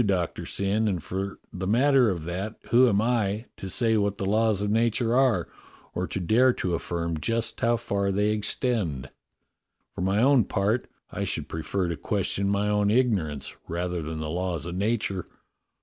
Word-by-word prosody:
Doctor 95 -5 -1
Syn, 100 +3 0
and 90 -7 -1
for 95 +1 -4 0.2
the 95 +1 -4
matter 130 +2 +4
of 85 -5 -3
that 95 +6 -4 0.2
who 125 +1 +6
am 100 -2 +2
I, 110 -2 0
to 95 - -6
say 115 +3 +2
what 100 -1 0
the 95 - -3
laws 105 0 +2
of 105 - 0
nature 115 +1 +2
are, 125 -10 +3 0.5
or 90 +1 -2
to - - -3
dare 120 +8 +4
to 90 -6 -2
affirm 85 -1 -2
just 115 +7 -1
how 120 0 +3
far 100 -2 -1
they 105 +2 +1
extend.^ 105 - -1 0.8
For - - -6
my 95 +3 +1
own 130 -2 +5
part, 105 +6 0 0.2
I - - -3
should - - -2
prefer 90 +3 -2
to 85 -2 -3
question 100 +3 0
my 100 +1 +1
own 105 0 +2
ignorance 100 - 0
rather 90 +1 -2
than 80 +1 -5
the 75 0 -3
laws 90 -2 -2
of 85 - -5
nature." 100 -1 -1
100 Hz, 180 wpm, -26 LUFS, 90-115 Hz, 0.8 s, who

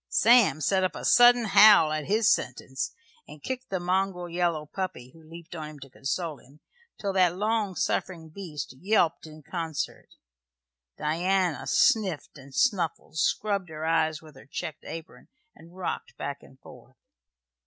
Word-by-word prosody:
Sam 230 -8 +4
set 190 +5 +2
up 185 - -1
a - - -6
sudden 245 -1 +6
howl 200 -5 +7
at 155 -1 -3
his 215 +2 +2
sentence, 130 +1 -4 0.4
and 150 0 -13
kicked 260 0 -5
the 190 - -2
mongrel 180 0 -1
yellow 170 -3 -1
puppy, 150 -7 -6
who 165 - -17
leaped 165 +2 -12
on 155 -2 -6
him 150 -1 -12
to 135 -1 -11
console 155 +3 -3
him, 140 +4 -20 0.4
till 200 -1 -2
that 180 -2 +3
long 210 -2 0
suffering 165 -3 -2
beast 155 -6 -7
yelped 175 -5 +1
in 155 0 -13
concert. 165 -2 -5 0.9
Diana 175 +2 0
sniffed 190 -10 +2
and 135 0 -14
snuffled, 170 -4 0
scrubbed 200 +1 0
her 155 0 -6
eyes 160 -1 +1
with 155 -2 -15
her 135 - -15
checked 155 +1 -6
apron, 165 +1 -9 0.3
and 170 +2 -17
rocked 155 -8 -5
back 140 0 -5
and 130 - -18
forth. - - -16
170 Hz, 155 wpm, -27 LUFS, 155-195 Hz, 0.9 s, howl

